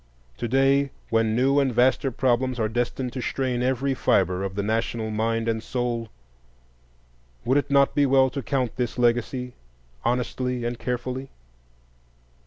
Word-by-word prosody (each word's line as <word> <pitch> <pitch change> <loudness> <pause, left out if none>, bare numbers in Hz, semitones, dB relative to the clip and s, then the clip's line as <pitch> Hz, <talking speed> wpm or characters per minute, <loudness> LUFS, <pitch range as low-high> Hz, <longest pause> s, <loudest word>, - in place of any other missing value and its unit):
To - - -3
day, 135 +3 +3 0.2
when 115 -1 +2
new 135 +4 +3
and 135 -2 +2
vaster 130 +3 +3
problems 130 0 0
are 110 - +1
destined 120 +2 -2
to 130 - -4
strain 125 -1 -1
every 130 +2 0
fibre 95 -7 +1
of 95 -1 -4
the 100 - -1
national 110 +1 -1
mind 115 +1 -1
and 110 -1 0
soul, 120 -2 -3 1.4
would 130 +4 +3
it 145 - -4
not 140 -1 +4
be 145 -1 +3
well 130 -1 +4
to 140 - -4
count 130 -2 -2
this 125 -2 -2
legacy 125 +1 0 0.5
honestly 125 0 -1
and 120 0 -3
carefully? 125 +2 -3
125 Hz, 150 wpm, -25 LUFS, 115-130 Hz, 1.4 s, not